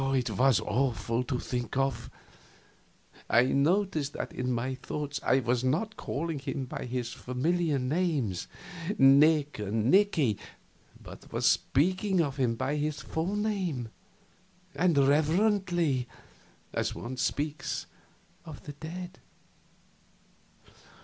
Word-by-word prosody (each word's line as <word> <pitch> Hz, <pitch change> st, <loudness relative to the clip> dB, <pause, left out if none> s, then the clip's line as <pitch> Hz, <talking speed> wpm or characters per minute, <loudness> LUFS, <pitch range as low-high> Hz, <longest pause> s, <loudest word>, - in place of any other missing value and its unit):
It 125 Hz, -2 st, 0 dB
was 130 Hz, -2 st, +4 dB
awful 120 Hz, 0 st, 0 dB
to 130 Hz, -2 st, -1 dB
think 125 Hz, 0 st, -3 dB
of. 135 Hz, -4 st, -1 dB, 1.2 s
I 120 Hz, -, +6 dB
noticed 155 Hz, +2 st, +1 dB
that -, -, -5 dB
in 125 Hz, 0 st, -2 dB
my 125 Hz, +2 st, -1 dB
thoughts 145 Hz, +2 st, -4 dB
I 130 Hz, -, +3 dB
was 120 Hz, 0 st, 0 dB
not 175 Hz, +12 st, 0 dB
calling 160 Hz, -3 st, -3 dB
him 135 Hz, 0 st, -4 dB
by 125 Hz, -, -6 dB
his 125 Hz, -1 st, -3 dB
familiar 155 Hz, +5 st, 0 dB
names, 135 Hz, -, -1 dB, 0.5 s
Nick 145 Hz, +1 st, +5 dB
and 105 Hz, +3 st, 0 dB
Nicky, 165 Hz, -, +3 dB, 0.6 s
but -, -, -12 dB
was -, -, -1 dB
speaking 185 Hz, +6 st, +2 dB
of 145 Hz, -4 st, 0 dB
him 125 Hz, -4 st, +1 dB
by 130 Hz, +5 st, -1 dB
his 150 Hz, 0 st, -2 dB
full 170 Hz, +6 st, -2 dB
name, 190 Hz, -, -1 dB, 0.8 s
and 175 Hz, -4 st, +2 dB
reverently, 160 Hz, -, +2 dB, 0.7 s
as -, -, -1 dB
one 125 Hz, +2 st, -6 dB
speaks 145 Hz, +4 st, -2 dB, 0.6 s
of 155 Hz, -4 st, -10 dB
the 145 Hz, -, -7 dB
dead. 175 Hz, +5 st, -8 dB
140 Hz, 115 wpm, -29 LUFS, 125-165 Hz, 1.2 s, I